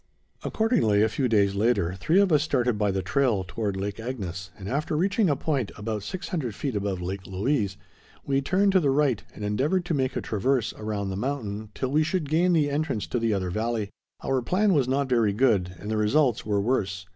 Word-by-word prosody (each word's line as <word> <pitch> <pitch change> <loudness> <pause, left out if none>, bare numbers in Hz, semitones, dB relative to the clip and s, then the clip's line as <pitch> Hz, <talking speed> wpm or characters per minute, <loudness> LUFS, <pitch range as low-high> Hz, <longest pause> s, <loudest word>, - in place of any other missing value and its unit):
Accordingly, 115 - +2
a 110 - +3
few 125 +4 0
days 100 -4 +3
later, 100 -4 +1
three 155 - +2
of 200 -3 +3
us 150 -2 +5
started 125 -6 +1
by 105 -1 +1
the 95 -1 -1
trail 105 -1 +1
toward 100 +1 -3
Lake 100 +2 -4
Agnes, 95 -7 -5
and 95 -2 -8
after 150 +5 -1
reaching 195 +3 +2
a 145 - +2
point 135 -5 -1
about 105 0 -3
600 150 - -4
feet 135 -6 -3
above 100 -3 -2
Lake 95 0 -5
Louise, 100 +1 -1 0.5
we 135 0 +1
turned 195 +8 +2
to 190 - +5
the 145 -5 +1
right 135 -5 +2
and 105 - -5
endeavored 145 - 0
to 170 - -1
make 130 -3 0
a - - 0
traverse 120 +3 0
around 105 -2 -3
the - - -3
mountain 110 -3 -3
till 130 - -2
we 150 +2 +3
should 155 -1 -1
gain 175 +4 +3
the 155 -3 +3
entrance 140 -7 -1
to 120 - -2
the 115 -1 +1
other 95 -3 -1
valley. 110 0 -2 0.3
Our 135 -1 +1
plan 190 - +2
was 140 -6 +2
not 135 +1 +1
very 115 -5 +2
good 100 -6 +2
and 105 - -6
the 110 - 0
results 120 +4 +2
were 105 -1 +1
worse. 100 -5 -1
115 Hz, 215 wpm, -26 LUFS, 100-145 Hz, 0.5 s, us